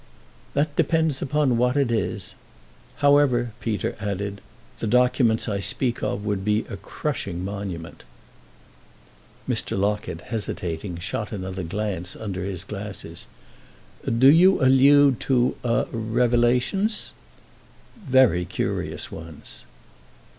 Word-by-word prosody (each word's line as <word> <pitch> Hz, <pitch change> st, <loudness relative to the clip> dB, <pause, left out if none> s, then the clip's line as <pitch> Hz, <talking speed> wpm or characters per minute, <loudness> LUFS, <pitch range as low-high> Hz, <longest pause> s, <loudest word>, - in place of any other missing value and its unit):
"That 145 Hz, +1 st, +1 dB
depends 160 Hz, -4 st, +1 dB
upon 140 Hz, -3 st, +1 dB
what 125 Hz, +3 st, +2 dB
it 135 Hz, -4 st, +2 dB
is. 110 Hz, -4 st, -2 dB, 0.7 s
However," 135 Hz, -5 st, +4 dB
Peter 110 Hz, -3 st, -2 dB
added, 100 Hz, -1 st, -4 dB, 0.4 s
"the 115 Hz, -, -2 dB
documents 125 Hz, -1 st, +3 dB
I 100 Hz, -2 st, -1 dB
speak 120 Hz, +5 st, -1 dB
of 105 Hz, -, -2 dB
would 100 Hz, -2 st, -1 dB
be 105 Hz, +1 st, +1 dB
a -, -, -5 dB
crushing 95 Hz, -, -4 dB
monument." 95 Hz, -5 st, -6 dB, 1.4 s
Mr. -, -, -1 dB
Locket, 100 Hz, -4 st, -1 dB
hesitating, 90 Hz, -5 st, -4 dB
shot 100 Hz, +5 st, -4 dB
another 95 Hz, -2 st, -4 dB
glance 90 Hz, 0 st, -3 dB
under 95 Hz, -4 st, -5 dB
his 95 Hz, -2 st, -4 dB
glasses. 100 Hz, -4 st, -8 dB, 0.8 s
"Do 130 Hz, +4 st, +5 dB
you 185 Hz, +5 st, +6 dB
allude 135 Hz, 0 st, +6 dB
to—a—revelations?" 120 Hz, -, +1 dB, 0.9 s
"Very 130 Hz, -, +4 dB
curious -, -, -3 dB
ones." 80 Hz, -2 st, -10 dB
110 Hz, 105 wpm, -24 LUFS, 100-130 Hz, 1.4 s, you